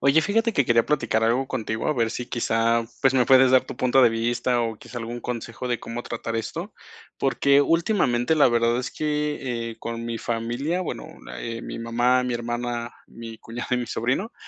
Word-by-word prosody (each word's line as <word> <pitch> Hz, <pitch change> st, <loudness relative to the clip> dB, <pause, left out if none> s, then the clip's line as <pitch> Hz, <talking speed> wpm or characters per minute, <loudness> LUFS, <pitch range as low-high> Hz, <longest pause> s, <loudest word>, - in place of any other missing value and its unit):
Oye, 140 Hz, +4 st, +5 dB
fíjate 225 Hz, +6 st, +1 dB
que 140 Hz, -, +2 dB
quería 115 Hz, -1 st, +4 dB
platicar 115 Hz, -6 st, +1 dB
algo 125 Hz, +4 st, +2 dB
contigo, 110 Hz, -3 st, -2 dB
a 155 Hz, -, +1 dB
ver 115 Hz, -2 st, +1 dB
si 120 Hz, +1 st, -5 dB
quizá, 115 Hz, 0 st, +1 dB, 0.2 s
pues, 135 Hz, -1 st, +3 dB
me 125 Hz, -2 st, +4 dB
puedes 130 Hz, +1 st, +6 dB
dar 130 Hz, 0 st, +5 dB
tu -, -, -8 dB
punto 130 Hz, +1 st, +4 dB
de 120 Hz, -, +6 dB
vista, 120 Hz, +2 st, 0 dB
o 115 Hz, -1 st, -2 dB
quizá 120 Hz, -, -8 dB
algún 120 Hz, +1 st, -5 dB
consejo 120 Hz, +1 st, -5 dB
de 120 Hz, -2 st, -1 dB
cómo 120 Hz, +1 st, -6 dB
tratar 115 Hz, -1 st, -4 dB
esto, 165 Hz, -, -5 dB, 0.4 s
porque 140 Hz, +1 st, +3 dB
últimamente, 160 Hz, -, +2 dB
la 150 Hz, -, +5 dB
verdad 120 Hz, 0 st, +2 dB
es 125 Hz, -, -3 dB
que, 150 Hz, -6 st, -2 dB
eh, 115 Hz, -, -10 dB
con 115 Hz, 0 st, -5 dB
mi 115 Hz, -1 st, -3 dB
familia, 120 Hz, +10 st, -2 dB
bueno, 175 Hz, -, -5 dB, 0.3 s
eh, 115 Hz, -, -5 dB
mi -, -, -6 dB
mamá, 120 Hz, +2 st, +2 dB
mi 125 Hz, -1 st, -1 dB
hermana, 120 Hz, 0 st, -3 dB, 0.2 s
mi 115 Hz, -1 st, -10 dB
cuñado 120 Hz, +1 st, -7 dB
y -, -, +1 dB
mi 120 Hz, -, -3 dB
sobrino, 130 Hz, -, -1 dB
120 Hz, 200 wpm, -24 LUFS, 115-135 Hz, 0.4 s, puedes